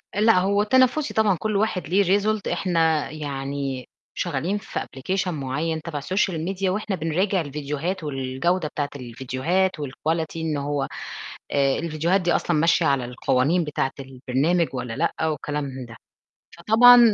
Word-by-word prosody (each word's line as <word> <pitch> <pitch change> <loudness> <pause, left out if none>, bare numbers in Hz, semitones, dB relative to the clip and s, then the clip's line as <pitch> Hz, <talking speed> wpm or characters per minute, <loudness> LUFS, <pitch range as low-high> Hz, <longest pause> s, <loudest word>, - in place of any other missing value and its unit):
لأ، 215 -2 +5
هو 200 +2 +2
تنافسي 260 +6 +3
طبعًا 215 -3 +3
كل 215 -1 -1
واحد 200 -5 0
ليه 195 +4 +3 0.2
result. 215 +1 0
احنا 165 -4 +1
يعني 140 -3 -4 0.3
شغالين 175 +4 -1
في 205 - -5
application 185 +9 -3
مُعين 155 +1 -2
تبع 155 -3 -4
social 190 +4 0
media، 195 0 -1
وإحنا 200 +1 -1
بنراجع 180 +4 0
الفيديوهات 150 +4 -3
والجودة 145 +5 -1
بتاعِة 145 -1 -3
الفيديوهات 130 +9 -1
و 145 - -3
الquality 160 +4 -2
إن 160 -2 -1
هو 145 0 -1 0.6
آآ، 140 -1 +2
الفيديوهات 170 +4 +1
دي 175 -1 +1
أصلًا 170 - +1
ماشية 165 +2 +3
على 140 -4 +2
القوانين 130 +7 +1
بتاعِة 150 -3 -1
البرنامج 135 +6 0
ولا 125 -3 -4
لأ، 160 0 0
وكلام 150 -1 -2
من 130 -2 -6
ده. 115 -1 -12 0.6
فطبعًا، 240 +7 +7
160 Hz, 145 wpm, -24 LUFS, 140-185 Hz, 0.6 s, فطبعًا